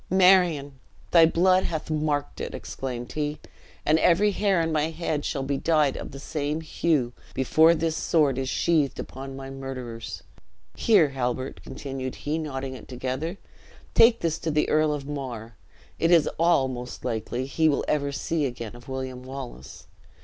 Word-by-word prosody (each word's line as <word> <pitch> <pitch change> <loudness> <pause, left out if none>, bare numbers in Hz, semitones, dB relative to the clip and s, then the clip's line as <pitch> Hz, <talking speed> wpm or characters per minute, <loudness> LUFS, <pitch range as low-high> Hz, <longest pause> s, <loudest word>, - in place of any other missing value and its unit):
"Marion, 180 -7 +4 0.3
thy 165 -2 +7
blood 185 +3 +3
hath 160 -1 -3
marked 150 -2 -1
it!" - - -4
exclaimed 125 -2 -5
he; 150 0 -2 0.5
"and 155 +2 +4
every 190 +6 +4
hair 200 -2 +2
on 165 -1 0
my 155 0 +1
head 160 -2 -2
shall 135 - -2
be 140 +1 -1
dyed 155 -4 +2
of - - -6
the 135 - -9
same 150 +2 -3
hue, 155 -6 0 0.2
before 160 +5 +5
this 160 -1 -1
sword 145 -7 +2
is 130 -1 -2
sheathed 155 -3 +1
upon 135 +1 -7
thy 135 0 -7
murderers. 130 -4 -6 0.5
Here, 195 -10 +4
Halbert," 130 -1 -3
continued 135 -2 -6
he, 155 +2 -2
knotting 135 -4 -4
it 130 - -10
together, 130 +8 -3 0.6
"take 230 0 +6
this 165 -1 0
to 165 - -2
the 150 0 +1
Earl 155 0 +3
of 145 -2 -3
Mar; 125 -6 -6 0.4
it 165 - +2
is 170 -4 +5
all, 165 -5 +4
most 125 -1 -7
likely, 120 +3 -2
he 160 +4 +2
will 145 - 0
ever 140 -2 0
see 150 +1 -1
again 120 -2 -7
of 120 +2 -13
William 130 -1 -4
Wallace. 130 - -9
145 Hz, 165 wpm, -26 LUFS, 130-160 Hz, 0.6 s, thy